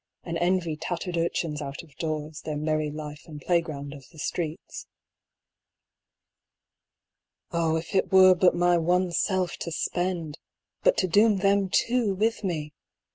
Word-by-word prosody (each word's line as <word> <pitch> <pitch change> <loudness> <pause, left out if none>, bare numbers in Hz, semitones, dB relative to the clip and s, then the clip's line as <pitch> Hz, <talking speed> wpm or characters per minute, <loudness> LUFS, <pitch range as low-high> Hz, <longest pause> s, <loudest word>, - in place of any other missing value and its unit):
and 170 - -4
envy 175 -2 +1
tattered 175 +3 -4
urchins 165 -2 -1
out 140 +1 -6
of 150 -4 -19
doors 155 -1 -4
their 155 -2 -4
merry 155 0 0
life 150 0 -8
and 150 -2 -9
playground 155 -4 -1
of 140 -3 -13
the - - -19
streets. 160 - -4 2.6
Oh, 165 -2 +1
if 160 +4 -4
it 190 - +1
were 185 -1 +8
but 180 0 +3
my 175 0 +3
one 180 +2 +1
self 185 0 0
to 170 - -5
spend! 170 -2 -2 0.4
but - - +3
to - - +2
doom 205 +4 +4
them 195 0 +2
too 230 0 +1
with 220 +3 0
me 155 -5 -3
170 Hz, 145 wpm, -26 LUFS, 155-185 Hz, 2.6 s, were